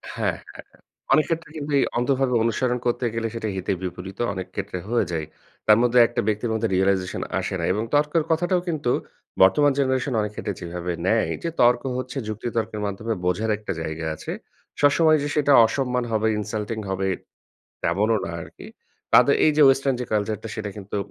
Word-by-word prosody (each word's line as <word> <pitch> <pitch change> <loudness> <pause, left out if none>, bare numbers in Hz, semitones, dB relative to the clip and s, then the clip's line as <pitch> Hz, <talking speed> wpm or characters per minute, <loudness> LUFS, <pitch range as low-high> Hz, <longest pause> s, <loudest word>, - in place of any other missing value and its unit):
হ্যাঁ, - - -1 0.2
হ্যাঁ। - - -15 0.3
অনেক 155 - +4
ক্ষেত্রে 165 -2 -2
কিন্তু 145 0 -5
এই - - +3
অন্ধভাবে 130 +1 +1
অনুসরণ 125 +2 0
করতে 120 +1 0
গেলে 115 0 -1
সেটা 110 -2 -3
হিতে 95 +1 -2
বিপরীতও 95 +5 -4
অনেক 95 0 -5
ক্ষেত্রে - - -4
হয়ে 120 -4 +2
যায়। 80 -2 -2 0.4
তার 105 - +7
মধ্যে 125 0 +4
একটা 120 - -2
ব্যক্তির 110 +2 0
মধ্যে 110 0 0
রিয়ালাইজেশন 95 -1 +1 0.2
আসে - - -3
না - - -3
এবং 105 - -1
তর্কের 150 +2 +2
কথাটাও 175 +2 +2
কিন্তু 150 -7 -1 0.5
বর্তমান 145 +10 +5
জেনারেশন 130 0 0
অনেক 105 0 -3
ক্ষেত্রে 105 - -3
যেভাবে 90 +1 -4 0.2
নেয়। 110 +2 +2
যে, 170 - -1
তর্ক 120 0 +4
হচ্ছে 130 +2 -5
যুক্তি 110 +2 -4
তর্কের 110 -2 -2
মাধ্যমে 110 +3 -3
বোঝার 100 +5 0
একটা 105 -2 -6
জায়গা 80 0 -4
আছে। - - -7 0.5
সবসময় 155 +2 +5
যে - - -1
সেটা 145 -1 +3
অসম্মান 125 +1 -1
হবে, 110 0 +1
ইনসাল্টিং 105 +1 -4
হবে 95 0 -1 0.8
তেমনও 105 +6 +2
না 85 - -4
আরকি। - - -12 0.5
তাদের - - +7
এই 155 - +5
যে 150 - +6
ওয়েস্টার্ন 135 0 +3
যে 125 - -3
কালচারটা 110 +1 -1
সেটা 110 -2 -4
কিন্তু 105 0 -6
115 Hz, 180 wpm, -24 LUFS, 100-135 Hz, 0.8 s, তার